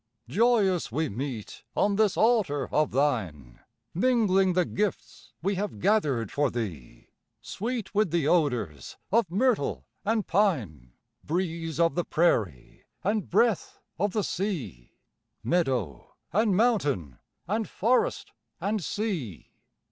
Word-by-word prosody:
Joyous 200 - +2
we 155 +4 -1
meet, 120 -1 -5 0.2
on 200 0 +2
this 210 -2 +2
altar 205 - +2
of 150 -2 +3
thine 95 - -1 0.3
Mingling 195 -3 +3
the 180 0 +2
gifts 210 -3 -3
we 195 +3 +1
have 200 - -3
gathered 135 - +1
for 145 -1 +1
thee, 85 - -6 0.3
Sweet 230 0 -4
with 210 -2 +2
the 165 -3 +1
odors 125 - 0
of 225 -3 +3
myrtle 210 - +1 0.2
and 220 0 0
pine, 110 - 0 0.3
Breeze 165 -1 -2
of 165 0 +3
the 175 - 0
prairie 105 - 0 0.2
and 205 0 0
breath 220 +1 +1 0.2
of 200 0 0
the 215 - 0
sea, 145 - -4 0.5
Meadow 130 - -1 0.2
and 205 -1 +3
mountain 145 - +1 0.3
and 215 +3 -1
forest 240 +6 +1 0.3
and 205 -1 -1
sea! 170 - -4
175 Hz, 120 wpm, -27 LUFS, 125-210 Hz, 0.5 s, of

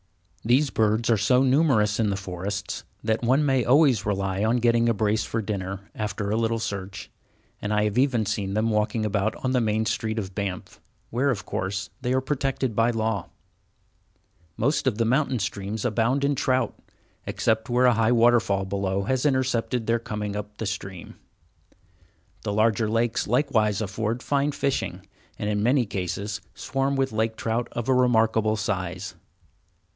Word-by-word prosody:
These 130 +4 +3
birds 110 +2 +2
are 115 - +4
so 125 +5 +3
numerous 130 -7 +3
in 110 -2 +2
the 100 - 0
forests 95 +1 -4 0.2
that 110 0 0
one 130 +5 +3
may 135 -3 +2
always 130 -3 +4
rely 95 -1 -1
on 115 +3 +2
getting 120 0 +3
a - - +3
brace 110 +1 +1
for 115 -1 -3
dinner, 95 -2 -4
after 105 -1 -3
a - - +1
little 115 0 +1
search, 100 -3 -5 0.5
and 105 - -3
I 105 0 +2
have 105 +3 +1
even 125 -5 +2
seen 100 -1 -2
them 110 +1 +1
walking 110 +1 0
about 105 0 0
on 130 - +1
the 125 -1 +2
main 110 0 +1
street 110 0 -1
of 95 -3 -4
Banff, 95 -3 -5 0.3
where, 130 +5 +1
of 120 -7 -2
course, 95 +1 -3
they 125 -1 -1
are 130 - +2
protected 135 -3 -1
by 115 +2 +3
law. 110 -2 -1 1.3
Most 140 +4 +1
of 115 -5 +1
the 115 - +1
mountain 130 +2 +1
streams 100 +1 -3
abound 120 +4 +1
in 140 +1 +2
trout, 130 -3 +1 0.5
except 110 0 0
where 125 +1 +3
a 125 - +6
high 115 +1 +2
waterfall 115 -5 +3
below 100 0 -1
has 130 +6 +1
intercepted 125 -3 0
their 115 +1 +1
coming 105 -2 -4
up 105 0 -6
the 110 - -4
stream. 95 -3 -6 1.3
The - - -3
larger 110 +1 +2
lakes 115 +2 0
likewise 110 -4 +2
afford 110 +3 -2
fine 145 +1 +1
fishing, 140 -1 -2 0.3
and 105 - -3
in 105 -1 0
many 125 +3 +3
cases 100 +1 -4
swarm 135 +1 -1
with 135 -2 0
lake 110 +1 0
trout 115 +2 -1
of 120 -1 -4
a 130 - +4
remarkable 110 -3 +3
size. 95 -3 -3
110 Hz, 170 wpm, -25 LUFS, 105-125 Hz, 1.3 s, a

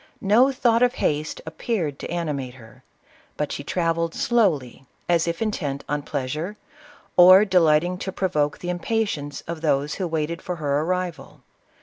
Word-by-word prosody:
No 230 +7 +5
thought 235 -3 +2
of 250 0 +3
haste 150 +1 -1
appeared 160 - -3
to - - -6
animate 145 -7 -3
her; 110 -3 -16 0.5
but 150 -1 -2
she 140 - -5
travelled 165 +1 -1
slowly, 155 - 0 0.2
as 170 -1 +2
if 170 +6 -1
intent 150 -10 -3
on 145 0 -1
pleasure, 150 +8 -4 0.6
or 185 +3 +9
delighting 175 -1 +3
to 190 - -4
provoke 150 -6 0
the 180 - -4
impatience 175 -6 -2
of 165 -1 -7
those 145 -1 +1
who 185 - -3
waited 165 +1 -2
for 180 - -4
her 145 -3 0
arrival. 180 +1 -3
165 Hz, 150 wpm, -23 LUFS, 145-185 Hz, 0.6 s, or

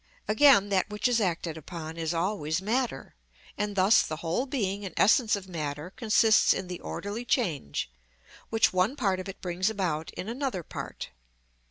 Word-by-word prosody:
Again, 215 -3 +5
that 195 0 +1
which 210 +3 0
is 240 -2 +2
acted 170 -4 -1
upon 160 0 -7
is 165 -1 -2
always 170 -2 -1
matter, 225 - -2 0.4
and 205 0 -2
thus 195 +3 +5
the 155 - -3
whole 170 - -2
being 205 -7 -2
and 190 - -7
essence 220 +1 +4
of 195 -2 -7
matter 155 -1 -5
consists 220 0 +4
in 190 - -4
the 180 -1 -6
orderly 205 +4 -5
change, 165 - -1 0.6
which 225 -3 +3
one 185 +8 +2
part 195 -9 0
of 185 - -6
it 195 - -9
brings 180 +2 0
about 175 -7 -2
in 185 - -5
another 245 -6 -3
part. - - -7
195 Hz, 170 wpm, -28 LUFS, 170-220 Hz, 0.6 s, Again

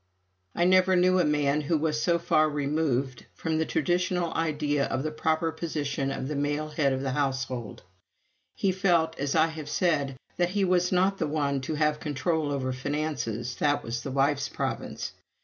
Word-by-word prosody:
I 175 - +2
never 185 0 +5
knew 185 +1 +4
a - - +4
man 150 -1 +2
who 155 +2 +1
was 155 0 0
so 170 0 +3
far 155 -2 +2
removed 140 -3 -1
from 160 -1 -1
the 160 - 0
traditional 175 +2 0
ideas 150 -3 0
of 130 - -1
the 155 - -2
proper 160 +1 0
position 145 -5 -2
of 135 -1 -3
the 150 - -3
male 145 +2 -1
head 150 -2 +1
of 130 0 -2
a 135 - -1
household. 130 -5 -2 0.7
He 195 - +1
felt, 175 -4 +2
as 140 +2 -1
I 160 0 +5
have 160 -2 -6
said, 145 -6 +1 0.2
that 175 0 +2
he 195 +1 +1
was 180 -1 +2
not 190 +2 +2
the 160 - 0
one 145 -2 0
to 155 +4 -3
have 150 0 +1
control 150 +1 -1
over 130 -2 -1
finances 130 -4 -3
that 145 -1 +1
was 120 +1 -3
the - - -5
wife's 135 +1 +1
province. - - -4
150 Hz, 185 wpm, -27 LUFS, 140-165 Hz, 0.7 s, never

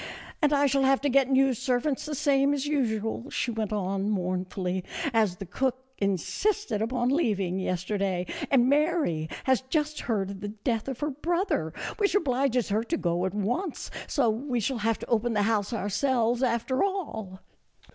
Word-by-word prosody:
" - - -16
And 300 -2 +4
I 285 -1 +4
shall 275 0 +2
have 270 0 +4
to 285 - +1
get 270 0 +4
new 270 0 +4
servants 255 +5 -1
the 300 - -3
same 280 +1 +3
as 280 0 -2
usual," 235 -3 -1
she 240 - -1
went 220 -2 -2
on, 195 -1 -1
mournfully, 185 -1 -2 0.2
" - - -3
as 215 -5 +3
the 195 - -7
cook 255 +7 -1 0.2
in 200 -1 +2
sisted 400 - -1
upon 240 +2 0
leaving 200 - +1
yesterday, 185 0 -1 0.2
and 250 -3 +4
Mary 285 - +1
has 260 -2 +3
just 300 +3 -1
heard 200 -5 -1
of 195 - -8
the 205 - -3
death 220 +2 -2
of 265 -1 -5
her 295 +1 0
brother, 325 - -1 0.3
which 410 -2 +1
obliges 255 - +1
her 215 +3 +1
to 330 +8 -1
go 175 - 0
at 190 - -5
once, 245 - -2 0.2
so 275 -6 +2
we 245 +2 -2
shall 240 +2 -1
have 225 +1 +1
to - - -7
open 235 0 +1
the 205 -1 +2
house 210 -1 +1
ourselves 235 +2 +1
after 255 +2 +1
all." 250 - -3
240 Hz, 185 wpm, -27 LUFS, 200-275 Hz, 0.3 s, And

